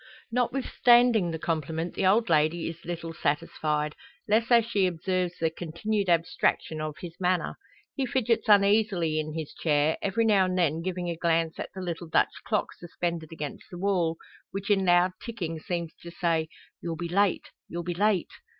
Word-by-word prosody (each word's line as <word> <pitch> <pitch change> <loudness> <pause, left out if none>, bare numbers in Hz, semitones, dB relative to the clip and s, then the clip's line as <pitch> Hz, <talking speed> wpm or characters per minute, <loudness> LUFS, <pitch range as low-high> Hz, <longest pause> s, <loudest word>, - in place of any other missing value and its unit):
Notwithstanding 240 -4 +3
the 165 - -3
compliment, 160 +1 -2
the 190 - +1
old 225 +4 +4
lady 160 0 +2
is 165 0 -7
little 170 -1 -5
satisfied 150 0 -1 0.3
less 225 +2 +2
as 235 -2 +5
she 200 -5 +2
observes 180 +1 -2
the 160 -1 0
continued 185 +5 -2
abstraction 165 -2 +1
of 155 -1 -4
his 175 -2 -7
manner. 180 -1 0 0.4
He 270 -2 -1
fidgets 240 -4 0
uneasily 200 -6 +4
in 155 0 -4
his 160 -3 -5
chair, 150 0 +1
every 200 +4 +1
now 200 -4 +4
and 185 0 -1
then 165 -2 +1
giving 180 0 -3
a - - -3
glance 165 -1 0
at - - -4
the 190 - -5
little 170 -1 -4
Dutch 160 - +2
clock 210 -2 0
suspended 170 -2 -4
against 150 -3 -6
the 175 - -8
wall, 175 -4 +1 0.3
which 195 +1 -3
in 195 -2 +3
loud 175 +1 +4
ticking 175 -9 -4
seems 170 0 -4
to 170 - -9
say, 165 -2 0 0.3
"You'll 170 -1 -3
be 170 +1 -4
late 195 +2 +1 0.2
you'll 170 0 -4
be 175 +1 -2
late." 200 0 +1
175 Hz, 175 wpm, -27 LUFS, 165-200 Hz, 0.4 s, as